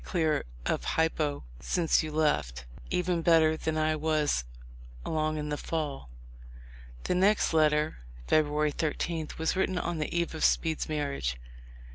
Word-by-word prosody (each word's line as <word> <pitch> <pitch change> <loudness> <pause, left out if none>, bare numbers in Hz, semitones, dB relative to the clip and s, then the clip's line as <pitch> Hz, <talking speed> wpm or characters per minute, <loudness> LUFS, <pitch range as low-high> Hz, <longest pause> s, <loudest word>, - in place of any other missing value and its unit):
221 - - -12
clear 160 -5 +1 0.3
of - - -9
hypo 155 - 0 0.2
since 165 - +2
you 155 -1 -5
left, 65 - 0 0.2
even 180 -1 0
better 160 -1 +4
than 160 0 -2
I 155 0 +2
was 150 - 0 0.6
along 155 0 -1
in 150 0 -3
the 150 - -2
fall." 145 - -4 0.9
The - - 0
next 195 +1 +3
letter, 155 -1 +2 0.3
February 150 -1 +2
13, 160 +1 -2
was 160 +3 0
written 190 -1 0
on 175 -2 -2
the 150 - -2
eve 170 -1 -1
of 160 - -4
Speed's 160 -2 +1
marriage. 140 - -2
155 Hz, 145 wpm, -29 LUFS, 150-165 Hz, 0.9 s, better